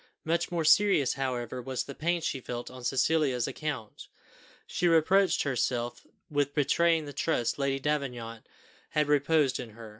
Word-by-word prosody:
Much 170 +2 0
more 170 -2 -1
serious, 175 -6 +4
however, 125 -2 -3
was 130 0 -3
the 140 - -8
pain 170 +4 -1
she 135 - -2
felt 120 -1 -6
on 130 -1 -11
Cecilia's 135 0 +1
account. 135 -5 -5 0.6
She 175 - 0
reproached 180 +4 +3
herself 120 -3 -2 0.2
with 145 -1 -1
betraying 160 +2 +2
the 145 - -8
trust 140 -5 -1
Lady 135 -1 0
Davenant 125 -6 -3 0.4
had 150 -1 +1
reposed 145 -1 +2
in 125 - -6
her. 115 -1 -9
140 Hz, 150 wpm, -29 LUFS, 125-160 Hz, 0.6 s, serious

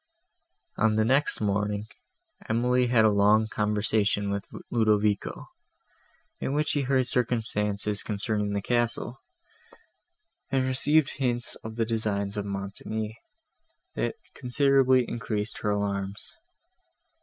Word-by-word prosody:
On 110 0 +3
the 110 0 +2
next 135 +3 +2
morning, 105 0 0 0.6
Emily 125 +2 +2
had 120 -2 +4
a 110 - +5
long 105 +2 +4
conversation 105 -1 0
with 100 0 -4 0.2
Ludovico, 105 -3 +1 0.9
in 135 - -2
which 150 +1 +1
she 145 - +1
heard 130 -1 +2
circumstances 105 -4 0
concerning 105 0 -1
the 100 -1 -2
castle, 120 +2 -1 1.3
and 130 -1 +1
received 140 +3 +2
hints 120 -3 -1
of 110 0 -7
the 115 -1 0
designs 105 -3 -1
of 105 -1 -3
Montoni, 100 +2 -4 0.8
that - - -2 0.2
considerably 130 -1 +3
increased 110 -2 -3
her 105 - -1
alarms. 100 -1 -2
110 Hz, 110 wpm, -27 LUFS, 105-125 Hz, 1.3 s, a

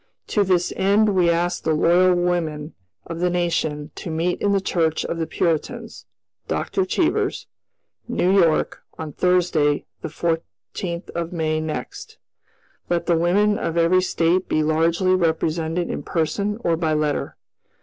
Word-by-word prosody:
"To 205 - +2
this 180 -2 +1
end 205 +3 +3
we 185 -4 +3
ask 170 +1 0
the 160 - +1
Loyal 180 +3 +4
Women 170 -4 -1 0.3
of 165 0 -6
the 180 +1 +2
Nation 165 -4 -1
to - - -7
meet 165 +3 -1
in 205 - +2
the 200 - +3
Church 165 -4 0
of 170 - -3
the 160 - -1
Puritans 160 -1 -2 0.4
(Dr. 385 -1 -1
Cheever's), - - 0 0.6
New 185 +2 +1
York, 170 -5 +2 0.2
on 155 -2 -6
Thursday, 175 -5 +2 0.2
the - - -4
14th 165 - -4
of 170 0 -4
May 155 -2 0
next. 400 - -6 0.7
"Let 170 -1 0
the 170 - +2
women 200 +5 +2
of 165 - -2
every 170 +2 +4
State 180 0 +1
be 155 - +2
largely 165 +4 +2
represented 165 -1 0
in - - -4
person 200 +5 -1
or 170 - +2
by 160 -1 0
letter. 150 -1 -1
170 Hz, 150 wpm, -22 LUFS, 160-180 Hz, 0.7 s, Loyal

